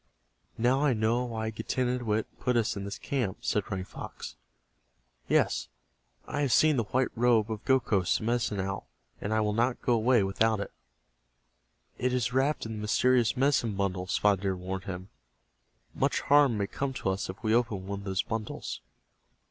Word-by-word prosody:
"Now 125 +5 +2
I 145 -3 +4
know 115 +3 +1
why 110 -2 -3
Getanittowit 120 -1 -1
put 125 -1 +1
us 115 0 +1
in 100 -1 -5
this 100 - -5
camp," 120 -9 -2
said 105 - 0
Running 95 -2 -3
Fox. - - -8 0.9
"Yes, - - +2 0.6
I 145 - -3
have 140 -3 +1
seen 155 +4 +5
the 115 - +1
white 130 +4 +1
robe 115 -2 +3
of 110 0 -4
Gokhos, 110 -9 +2
the - - -7
Medicine 115 -3 0
Owl, 95 -1 -3 0.3
and 105 - -3
I 110 0 +2
will 105 -1 0
not 120 +3 +1
go 120 - +3
away 115 -1 +4
without 110 +3 +1
it." 100 - -5 1.3
"It 125 0 +1
is 125 -1 0
wrapped 135 +2 +1
in 110 - -5
the 110 -1 -5
mysterious 120 +3 +2
medicine 130 -5 +2
bundle," 95 -2 -1
Spotted 100 0 +2
Deer 95 -1 0
warned 95 +1 -5
him. 95 0 -6 0.8
"Much - - 0
harm 140 -5 +4
may 100 - 0
come 135 +6 -3
to 110 - -2
us 95 0 -2
if 95 +4 -8
we 110 0 +2
open 115 -5 +1
one 100 0 -4
of 100 - -10
those 95 -2 0
bundles." 110 -2 -4
110 Hz, 180 wpm, -29 LUFS, 100-125 Hz, 1.3 s, seen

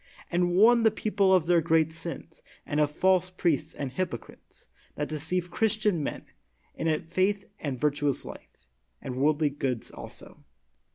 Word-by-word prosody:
And 175 0 +2
warn 230 +5 +6
the 225 - +5
people 205 -3 +1
of 185 -4 +4
their 170 -1 +4
great 160 -1 +2
sins, 165 -1 -8 0.2
and 145 - -1
of 150 -1 +3
false 185 +3 +2
priests 175 -6 -1
and 140 -3 -4
hypocrites, 130 -5 -6 0.3
that 150 - -3
deceive 160 +4 -3
Christian 215 -3 +1
men, 145 - -4 0.5
in 160 -1 -1
faith 190 +4 0
and 135 -5 -4
virtuous 145 -1 0
life, - - -12 0.3
and 130 -1 -6
worldly 150 +2 +2
goods 135 -4 -3
also. - - -11
165 Hz, 150 wpm, -28 LUFS, 145-185 Hz, 0.5 s, warn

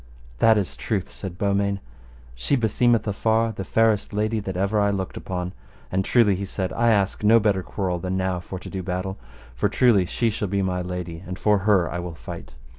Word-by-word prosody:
That 110 -1 +6
is 95 -3 -2
truth, 100 -5 -2
said 95 -3 -7
Beaumains. 100 0 +1 0.6
She - - 0
beseemeth 115 -1 +2
afar 110 +2 +1
the 100 -3 -5
fairest 110 +1 +2
lady 110 +2 0
that 95 -3 -4
ever 100 +3 +1
I 100 0 +3
looked 95 -2 -3
upon; 90 -1 -4 0.4
and 95 +1 +1
truly, 115 -1 +4
he 95 - -4
said, 95 -1 -3
I 120 0 +2
ask 100 -2 +1
no 110 +2 +6
better 100 -3 +2
quarrel 90 -1 -2
than 95 +2 -2
now 95 -1 0
for 95 +2 -7
to 90 - -10
do 95 - -3
battle, 90 +1 -3 0.3
for - - 0
truly 110 -8 +4
she 115 +5 0
shall 105 0 -2
be 100 +1 0
my 90 -1 -1
lady, 90 -1 -5
and 90 0 -5
for 105 0 +3
her 95 -5 +4
I 90 - -4
will 85 -1 -6
fight. 65 -2 -9
95 Hz, 205 wpm, -24 LUFS, 90-105 Hz, 0.6 s, That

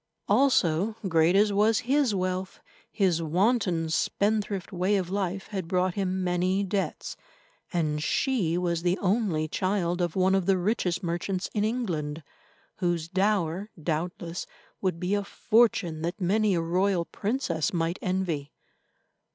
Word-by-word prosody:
Also, 210 - +3
great 165 0 +3
as 205 +1 +4
was 215 +2 +3
his 265 -3 +2
wealth, 185 0 -2 0.3
his 180 -5 +1
wanton, 180 0 +1
spendthrift 200 +3 0
way 185 +2 +1
of 185 -2 -1
life 195 -1 -2
had 190 -5 -4
brought 180 0 +1
him 190 -1 -1
many 180 +2 +1
debts, 195 0 -3 0.6
and 155 -4 0
she 185 - +1
was 170 -2 0
the 180 +2 +1
only 190 -6 0
child 180 0 -1
of 175 -2 -1
one 190 0 +3
of 195 -2 +1
the 195 -1 +4
richest 180 -2 0
merchants 180 +2 -2
in 210 - 0
England, 165 -10 -2 0.5
whose 175 -3 -1
dower, 190 0 0
doubtless, 165 +2 -3 0.3
would 185 -3 -1
be 180 +3 -1
a 205 0 +1
fortune 200 -7 +2
that 170 +6 -3
many 205 +2 +2
a 170 - +1
royal 180 +1 +1
princess 205 - -1
might 170 0 -1
envy. 180 -6 -2
185 Hz, 140 wpm, -27 LUFS, 170-200 Hz, 0.6 s, as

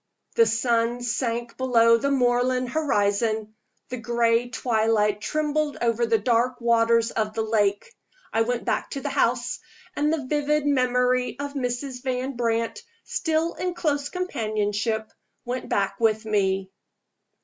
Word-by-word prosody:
The 230 - +5
sun 230 +1 +1
sank 235 0 -2
below 230 -3 +4
the 255 +5 0
moorland 250 -1 +1
horizon; 215 -6 0 0.4
the 255 - -4
gray 235 +1 +1
twilight 220 -3 +1
trembled 305 +2 -1
over 235 0 +1
the 225 0 +3
dark 245 +2 +1
waters 230 -1 +3
of 215 -1 -2
the 225 - 0
lake. 215 - 0 0.4
I 225 - +2
went 240 0 -1
back - - -1
to 275 - -5
the 285 - -3
house; 245 -3 0 0.4
and 300 +1 +1
the 310 -4 -1
vivid 295 +1 0
memory 250 -2 +1
of 285 0 -5
Mrs. 250 -1 -3
Van 260 +1 -2
Brandt, 230 - -1 0.2
still 325 0 -1
in 360 -1 -3
close 290 -4 -1
companionship, 220 - -2 0.3
went 250 +1 -4
back 195 -1 0
with 220 -1 +2
me. 195 -3 0
240 Hz, 140 wpm, -25 LUFS, 225-265 Hz, 0.4 s, The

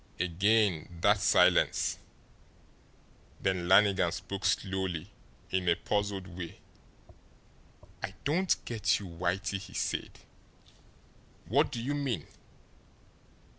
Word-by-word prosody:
Again 90 -1 +1
that 100 +2 +4
silence. 90 -2 +3 1.4
Then 90 -2 -1
Lannigan 95 -2 +5
spoke 95 +3 -5
slowly, 95 -2 -1 0.4
in 95 -2 +1
a 85 - +4
puzzled 100 -1 -2
way. 85 -2 -8 1.4
"I - - -5
don't 175 +6 +2
get 105 -4 +1
you, 100 - -8
Whitey," 90 +3 -2
he 95 - -11
said. - - -2 1.3
"What 140 - +2
do 120 - -4
you 130 +5 -2
mean?" 135 - -2
95 Hz, 95 wpm, -30 LUFS, 90-105 Hz, 1.4 s, Lannigan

